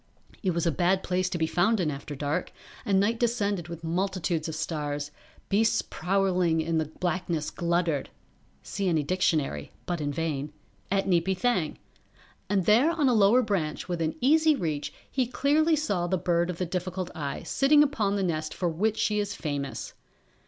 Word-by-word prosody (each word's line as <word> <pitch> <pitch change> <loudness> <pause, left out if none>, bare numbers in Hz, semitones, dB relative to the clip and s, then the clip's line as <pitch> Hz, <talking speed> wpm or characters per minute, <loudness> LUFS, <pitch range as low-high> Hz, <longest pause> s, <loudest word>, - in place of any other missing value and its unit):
It 185 -5 0
was 170 - 0
a 170 - +3
bad 185 +4 +1
place 185 0 0
to 185 - -2
be 160 - +1
found 195 +7 +2
in 160 -4 +1
after 145 +1 -6
dark, 145 +5 -2 0.3
and 195 -2 +3
night 225 +4 +1
descended 205 -7 0
with 170 -1 -8
multitudes 170 -2 -1
of 160 - -4
stars, 145 -2 -3 0.4
beasts 215 +2 +2
prowling 180 -3 +1
in 160 0 0
the 160 - 0
blackness 170 0 -2
gluttered 170 -4 0 0.5
[See 195 -1 -3
any 160 -3 +2
dictionary, 155 - 0
but 175 -3 -2
in 145 -1 -1
vain.] 150 -1 -3 0.4
at 195 0 +1
Neepy 185 +1 +2
Thang. 185 -9 0 0.7
And 195 -3 +1
there 235 - +5
on 315 -5 +2
a - - +3
lower 220 +4 +5
branch 190 -9 -2
within 165 -3 -1
easy 310 +4 +5
reach 155 - -2 0.2
he 260 -3 +1
clearly 300 +6 +2
saw 200 - -1
the 185 - +1
Bird 175 0 +1
of 180 - -3
the 180 - -1
Difficult 180 +1 -3
Eye 140 -3 -4
sitting 295 +2 +4
upon 220 -9 0
the 200 - 0
nest 155 -3 -2
for 175 - 0
which 210 +7 0
she 215 -2 +1
is 205 -1 -2
famous. 145 -3 -4
180 Hz, 175 wpm, -27 LUFS, 160-205 Hz, 0.7 s, there